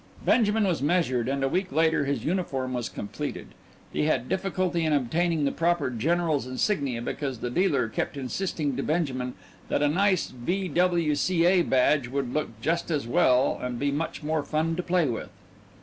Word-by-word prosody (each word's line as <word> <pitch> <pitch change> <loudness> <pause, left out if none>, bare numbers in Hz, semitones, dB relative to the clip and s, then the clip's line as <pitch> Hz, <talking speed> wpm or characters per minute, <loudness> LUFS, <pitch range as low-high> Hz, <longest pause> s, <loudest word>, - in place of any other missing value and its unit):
Benjamin 220 -2 +3
was 175 -6 0
measured, 140 -6 +1
and 135 0 -1
a - - +3
week 185 +6 -1
later 160 -1 +2
his 140 -5 -2
uniform 135 -7 -1
was 120 -2 -2
completed. 105 - -6 0.4
He - - +1
had 130 -5 +1
difficulty 185 -3 -1
in 155 -1 +1
obtaining 155 +4 +1
the 140 - +1
proper 165 -4 +1
general's 155 +2 0
insignia 130 - -1
because 135 0 -3
the 120 +2 -4
dealer 140 -7 +2
kept 110 - -3
insisting 145 +1 -2
to - - 0
Benjamin 130 -6 -1 0.3
that 145 - +1
a - - +4
nice 185 +4 +2
V.W.C.A. 175 +3 +2
badge 135 -2 +2
would 130 -1 -3
look 130 -8 -3
just 165 +7 0
as 150 -6 -1
well 125 +2 +3
and 125 -1 -3
be 140 +3 0
much 155 +2 -3
more 155 0 0
fun 155 +3 -1
to 180 - -1
play 180 -1 +1
with. 120 -3 -4
150 Hz, 170 wpm, -26 LUFS, 130-175 Hz, 0.4 s, a